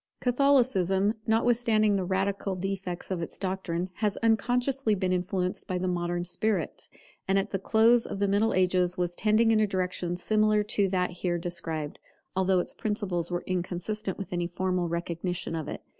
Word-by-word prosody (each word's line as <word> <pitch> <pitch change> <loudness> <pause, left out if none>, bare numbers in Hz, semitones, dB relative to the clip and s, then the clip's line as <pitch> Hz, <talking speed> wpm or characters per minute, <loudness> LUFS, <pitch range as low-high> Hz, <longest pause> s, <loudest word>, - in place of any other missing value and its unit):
Catholicism, 240 -7 +3
notwithstanding 225 -2 +3
the 190 - 0
radical 195 +1 -1
defects 190 -1 -4
of 180 -2 -1
its 165 - -5
doctrine, 185 -2 -3
has 210 -2 0
unconsciously 245 +2 +2
been 185 -1 0
influenced 180 0 -2
by 185 - -1
the 185 +1 -2
modern 175 -1 -1
spirit; 180 0 -1 0.4
and 195 +1 +3
at 195 +2 0
the 195 - -1
close 230 +4 +4
of - - -5
the 200 0 +1
Middle 205 +3 +2
Ages 180 0 +2
was 175 -1 -1
tending 220 +3 +3
in 220 - +4
a 215 - +3
direction 180 -2 -2
similar 215 +3 +2
to 205 -2 +1
that 180 -1 0
here 175 0 -2
described, 165 -3 -4 0.4
although 190 0 +2
its 180 - -1
principles 200 -6 -2
were 175 0 -2
inconsistent 185 +3 -3
with 195 -3 -6
any 175 -1 -1
formal 180 0 -1
recognition 170 0 -3
of 160 -3 -4
it. - - -6
190 Hz, 170 wpm, -28 LUFS, 180-215 Hz, 0.4 s, close